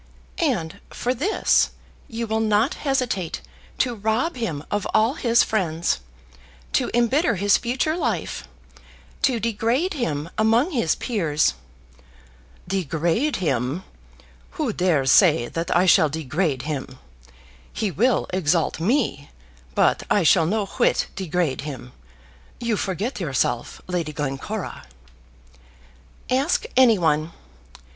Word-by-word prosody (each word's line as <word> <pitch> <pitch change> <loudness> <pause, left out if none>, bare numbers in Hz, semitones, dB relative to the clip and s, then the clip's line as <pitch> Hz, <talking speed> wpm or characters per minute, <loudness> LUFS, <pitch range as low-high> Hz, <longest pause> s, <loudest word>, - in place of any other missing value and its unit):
"And 215 - -1
for 250 - -2
this 320 - +2 0.4
you 230 0 -4
will 220 0 -1
not 220 +3 +2 0.2
hesitate 245 -11 -1 0.4
to 250 -2 +1
rob 220 +9 -1
him 190 - -3
of 205 -1 -1
all 225 +4 +4
his 235 -5 +3
friends, 170 - 0 0.7
to - - +1
embitter 240 +4 +2
his 200 +2 +3
future 255 +6 -1
life, 230 - -2 0.7
to 250 -4 +2
degrade 230 - 0
him 165 - -3
among 230 +9 +3
his 235 - +1
peers, 165 - 0 0.6
" - - -27
"Degrade 175 - 0
him! 140 0 -1 0.7
Who - - -1
dares 155 -8 +2
say 155 - +5
that 165 0 -3
I 180 - +4
shall 160 -3 +5
degrade 155 -2 -1
him? 135 -3 -5 0.7
He 210 -3 -2
will 235 +5 +2
exalt 170 -3 +1
me, 185 - 0 0.5
but - - +3
I 205 - +3
shall 165 0 +4
no 210 +2 0
whit - - +1
degrade 175 -7 -1
him. 135 -4 -7 0.7
You 235 -2 0
forget 205 +6 -3
yourself, 130 -7 -1
Lady 170 -4 -3
Glencora." 145 +9 -4 1.5
"Ask 275 - +1
any 245 -4 +6
one. 160 -1 +1
190 Hz, 120 wpm, -23 LUFS, 155-235 Hz, 1.5 s, any